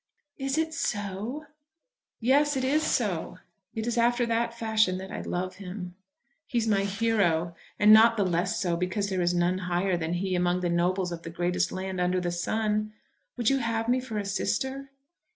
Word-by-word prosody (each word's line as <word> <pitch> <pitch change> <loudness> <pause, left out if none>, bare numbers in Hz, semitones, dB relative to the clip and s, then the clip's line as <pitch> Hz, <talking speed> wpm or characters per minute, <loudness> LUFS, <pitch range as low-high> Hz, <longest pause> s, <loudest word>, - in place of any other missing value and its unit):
"Is 270 +2 -1
it 320 0 0
so?" 215 0 -3 0.7
"Yes, 280 +4 +3
it 260 - -1
is 285 +4 +2
so. 195 - -1 0.4
It 220 -1 -2
is 240 0 0
after 240 +1 +3
that 235 0 -1
fashion 220 -5 +2
that 190 +1 -8
I - - -4
love 185 +1 -3
him. 180 -2 -7 0.5
He 245 - -2
is 225 -1 +1
my 200 -2 +2
hero; 195 -6 +1 0.2
and 210 +1 +7
not 230 +1 +7
the 205 - +3
less 180 +4 0
so 175 -3 0
because 185 +4 -1
there 190 -2 -1
is 175 0 +1
none 175 +1 +1
higher 180 +1 +1
than 165 0 -2
he 185 +2 -1
among 180 0 +1
the 175 - 0
nobles 180 +1 +1
of 170 -1 -5
the 165 - -7
greatest 175 +2 -1
land 185 -1 -3
under 180 +1 +1
the 175 -1 -2
sun. 215 +4 -1 0.4
Would 240 0 +2
you 270 - +2
have 230 -2 -1
me 250 +2 +3
for 250 -4 -5
a 205 - -2
sister?" 265 +7 -2
200 Hz, 190 wpm, -27 LUFS, 180-230 Hz, 0.7 s, and